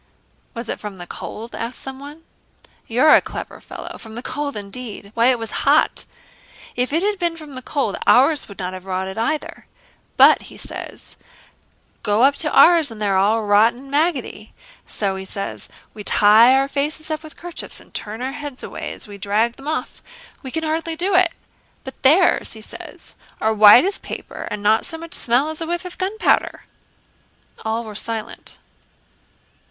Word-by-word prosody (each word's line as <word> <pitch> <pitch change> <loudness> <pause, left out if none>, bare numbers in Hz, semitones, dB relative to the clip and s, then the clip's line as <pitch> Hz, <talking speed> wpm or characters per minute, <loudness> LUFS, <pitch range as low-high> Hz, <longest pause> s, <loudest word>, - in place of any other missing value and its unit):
'" - - -39
"Was 235 0 -6
it - - -4
from 210 -2 -7
the 175 -1 -9
cold?" 225 +6 -8
asked 235 +2 -5
someone. 285 +4 -9 0.6
"You're 255 +7 +5
a - - +7
clever - - -7
fellow! - - -9
From 220 -1 -11
the 240 - -6
cold 290 -3 -3
indeed! 205 0 -8
Why, 235 +1 +3
it 255 -1 +4
was 225 -2 -6
hot. 290 +2 +3 0.7
If 250 +2 -1
it 325 +4 +1
had 410 -1 0
been 340 -2 -1
from 305 -3 -11
the 255 - -7
cold, 265 -6 -2
ours 280 +4 +4
would 200 - -11
not 185 0 -4
have 185 0 -9
rotted 190 +2 -3
either. 300 +7 -3 0.5
'But,' - - +6
he - - -13
says, - - -9 0.8
'go 215 +1 +2
up 275 +2 +6
to 305 - 0
ours 335 -4 +6
and 225 -2 -10
they 210 - -1
are 195 -1 +2
all 215 +3 +2
rotten 210 +3 +4
and 270 +2 -13
maggoty. 285 -8 -1 0.3
So,' 195 -2 -2
he 190 - -6
says, 195 +1 -5 0.2
'we 210 - -8
tie 220 +6 +6
our 270 0 +2
faces 300 +3 -2
up 310 0 -2
with 310 -1 -12
kerchiefs 350 0 -6
and - - -20
turn 220 +3 -5
our 260 - -2
heads 290 -2 -7
away - - -6
as - - -10
we 200 -1 -10
drag 215 +4 +1
them 275 +4 -12
off: 315 +1 -3 0.4
we 265 - -7
can 320 +5 -3
hardly 320 +1 -2
do 370 +4 -1
it. 365 -2 +4 0.5
But 265 - -10
theirs,' 325 +7 +4
he 220 - -11
says, - - -11 0.3
'are 220 0 +1
white 215 +6 +8
as 395 - -2
paper - - -7
and 210 -1 -5
not 215 +2 +4
so 325 - -2
much 335 +1 -9
smell 255 +5 +2
as 315 - -8
a 325 - -3
whiff 345 +2 -3
of 360 - -9
gunpowder.'" 395 +4 +1 1.0
All 225 +1 -1
were 215 -2 -8
silent. 220 +1 -5
255 Hz, 190 wpm, -21 LUFS, 215-310 Hz, 1.0 s, white